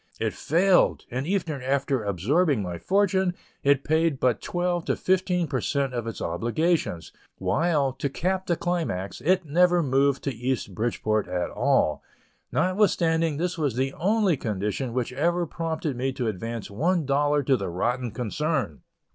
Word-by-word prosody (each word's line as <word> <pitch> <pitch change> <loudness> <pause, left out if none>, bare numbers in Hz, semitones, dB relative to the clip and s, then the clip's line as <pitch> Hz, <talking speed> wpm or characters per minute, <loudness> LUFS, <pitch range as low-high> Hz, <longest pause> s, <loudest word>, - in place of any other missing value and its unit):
It - - -1
failed; 180 +4 +2
and 130 +4 -3
even 170 -7 -1
after 135 -1 0
absorbing 115 - +1
my 90 -2 -5
fortune, 190 - +1 0.3
it 140 -1 +3
paid 160 -2 +1
but 125 -4 +2
from - - -9
twelve 175 -1 0
to - - +1
fifteen 185 -1 +1
per 130 -3 -2
cent 140 -3 -1
of 120 -2 -3
its 115 - -5
obligations, 115 - -1 0.3
while, 150 -5 +1
to 140 +2 -3
cap 185 +6 -2
the 170 - +2
climax, 165 - -2
it 185 +2 +2
never 175 +4 +4
removed 135 0 +2
to 140 - -2
East 120 -3 -2
Bridgeport 110 -1 -1
at 90 -1 -2
all, 125 - +1 0.5
notwithstanding 165 -5 +2
this 175 +1 -2
was 145 -7 0
the 135 +2 0
only 200 -1 +2
condition 105 +4 -2
which 125 0 -2
ever 170 +6 +1
prompted 160 -3 -3
me 130 +2 -1
to 125 - -3
advance 110 +2 -4
one 165 - +1
dollar 145 +1 +2
to 135 0 +3
the 100 -6 -3
rotten 120 +8 -1
concern! 125 - -2
140 Hz, 160 wpm, -26 LUFS, 120-170 Hz, 0.5 s, never